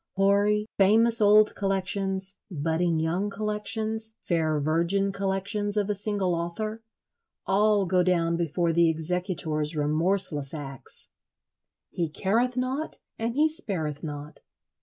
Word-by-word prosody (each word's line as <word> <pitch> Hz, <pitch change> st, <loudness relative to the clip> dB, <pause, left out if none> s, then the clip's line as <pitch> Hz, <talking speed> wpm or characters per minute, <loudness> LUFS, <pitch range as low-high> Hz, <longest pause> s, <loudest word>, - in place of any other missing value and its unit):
Hoary, 200 Hz, +2 st, +2 dB
famous 225 Hz, +4 st, +4 dB
old 210 Hz, +1 st, +6 dB
collections, 195 Hz, 0 st, -1 dB
budding 165 Hz, 0 st, 0 dB
young 175 Hz, +6 st, -1 dB
collections, 215 Hz, +2 st, -2 dB
fair 160 Hz, -3 st, 0 dB
virgin 170 Hz, +7 st, +1 dB
collections 200 Hz, +2 st, -1 dB
of 210 Hz, 0 st, +1 dB
a -, -, +1 dB
single 200 Hz, -2 st, -1 dB
author—all 215 Hz, -, -2 dB
go 180 Hz, +1 st, +2 dB
down 170 Hz, -2 st, +1 dB
before 170 Hz, 0 st, 0 dB
the 170 Hz, 0 st, +4 dB
executor's 160 Hz, -2 st, -1 dB
remorseless 155 Hz, -1 st, +1 dB
axe. 135 Hz, -4 st, -8 dB, 0.8 s
He 170 Hz, -2 st, -2 dB
careth 230 Hz, +10 st, 0 dB
not 260 Hz, +5 st, -2 dB, 0.2 s
and 230 Hz, +1 st, -2 dB
he 305 Hz, +2 st, +4 dB
spareth 175 Hz, -, -1 dB
not. 150 Hz, 0 st, -7 dB
195 Hz, 115 wpm, -26 LUFS, 165-210 Hz, 0.8 s, old